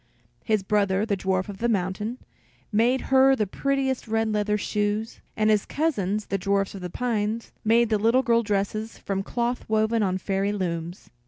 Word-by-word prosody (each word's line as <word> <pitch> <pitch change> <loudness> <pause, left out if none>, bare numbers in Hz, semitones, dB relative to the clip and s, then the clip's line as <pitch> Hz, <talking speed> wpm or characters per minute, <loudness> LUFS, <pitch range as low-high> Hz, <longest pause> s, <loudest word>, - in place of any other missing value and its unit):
His 215 -3 +1
brother, 200 0 +1
the 210 -3 0
dwarf 190 0 -1
of 200 -2 -8
the 235 - +1
mountain, 210 +3 -1 0.5
made 235 +5 +3
her 270 0 +6
the 215 - 0
prettiest 265 +4 -1
red 225 0 0
leather 210 0 +1
shoes, 210 +1 -2 0.2
and 215 0 +3
his 210 -2 +3
cousins, 215 - -1
the 195 - -2
dwarfs 195 +1 0
of 195 - -8
the 180 - -4
pines, 225 +1 -2
made 230 +1 +4
the 215 -2 +2
little 230 +5 +3
girl 235 -2 +3
dresses 215 +1 -2
from 195 -1 -3
cloth 240 +4 -2
woven 220 +1 +2
on 185 -2 +1
fairy 195 +2 -1
looms. 175 -2 -4
210 Hz, 175 wpm, -25 LUFS, 195-230 Hz, 0.5 s, her